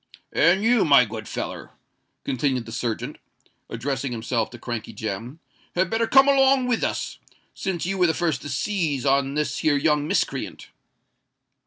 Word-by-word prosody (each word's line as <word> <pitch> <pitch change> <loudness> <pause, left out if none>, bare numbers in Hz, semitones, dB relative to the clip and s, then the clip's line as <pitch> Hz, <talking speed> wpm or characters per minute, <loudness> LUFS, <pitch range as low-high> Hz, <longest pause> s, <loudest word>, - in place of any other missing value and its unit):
"And 190 +3 +4
you, 235 0 +4
my 140 -5 +6
good 110 0 -7
feller," - - -6 0.5
continued 130 -2 -1
the 115 - -9
serjeant, 115 -1 -3 0.5
addressing 135 +3 -3
himself 115 -1 -1
to 120 - -11
Crankey 115 -2 -5
Jem, 110 +7 -5 0.4
"had 180 0 +1
better 225 0 +1
come 270 +3 +6
along 270 -1 +4
with 245 -2 0
us—since 180 -4 -4
you 195 +1 -2
was 180 - +5
the 160 - +1
first 170 -3 0
to 145 - -7
seize 150 -2 -1
on 140 0 +2
this 150 0 -1
here 145 -2 +2
young 150 0 +1
miscreant." - - -2
145 Hz, 155 wpm, -24 LUFS, 120-185 Hz, 0.5 s, my